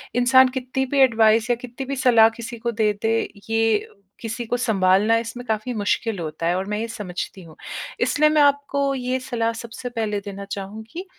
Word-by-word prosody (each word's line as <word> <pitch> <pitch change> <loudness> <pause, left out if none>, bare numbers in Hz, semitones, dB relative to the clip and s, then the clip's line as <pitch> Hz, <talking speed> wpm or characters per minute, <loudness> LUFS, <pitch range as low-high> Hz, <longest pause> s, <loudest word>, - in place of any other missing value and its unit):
इंसान 260 +1 +6
कितनी 260 +1 -2
भी 275 +2 -1
एडवाइस 225 -2 +4
या 240 - +3
कितनी 245 +2 -8
भी 275 - -3
सलाह 235 -4 +5
किसी 235 +1 -7
को 235 +1 -2
दे 215 -1 +1
दें, 225 +1 +1 0.2
ये 225 -1 +2 0.3
किसी 230 +1 -4
को 245 +2 -1
संभालना 205 -2 +3
इसमें 235 +2 -5
काफ़ी 220 +2 -2
मुश्किल 210 0 -1
होता 155 0 -5
है 175 - +2
और 190 - -2
मैं - - 0
ये 230 - -2
समझती 190 -3 -6
हूँ। 160 -2 -14 0.4
इसलिए 305 +1 +3
मैं 305 -1 +3
आपको 280 -1 +2
ये 255 0 -2
सलाह 235 -3 -2
सबसे 240 +2 -7
पहले 220 -4 -2
देना 200 0 -7
चाहूँगी 215 - -7
230 Hz, 190 wpm, -22 LUFS, 215-255 Hz, 0.4 s, इंसान